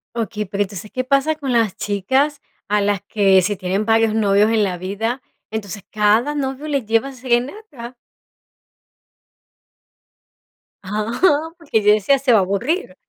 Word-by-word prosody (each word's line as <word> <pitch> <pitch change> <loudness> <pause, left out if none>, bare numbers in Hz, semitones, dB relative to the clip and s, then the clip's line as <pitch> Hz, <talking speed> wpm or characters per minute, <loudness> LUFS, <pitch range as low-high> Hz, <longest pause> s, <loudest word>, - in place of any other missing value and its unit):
Okey, 215 -2 -3
pero 200 +2 -1
entonces, 200 +1 -9
¿qué 255 - -2
pasa 275 +4 +1
con 280 -4 -4
las 225 -5 +1
chicas 260 +9 0 0.3
a 210 0 +1
las 200 -2 0
que, 195 -2 +3
si 205 +3 -1
tienen 190 +3 -2
varios 225 -1 +3
novios 210 0 +3
en 220 -2 +2
la 185 -2 -2
vida, 220 +8 -3 0.3
entonces 205 -2 -6
cada 215 +7 +2
novio 270 +1 -3
le 280 -6 -1
lleva 225 +5 0
serenata? 255 - -3 2.9
Ah, 235 - 0
porque 285 -10 -1
yo 210 - +6
decía, 215 +7 +2
se 255 -2 +2
va 220 - +6
a - - +3
aburrir. 240 - -2
225 Hz, 145 wpm, -19 LUFS, 205-270 Hz, 2.9 s, yo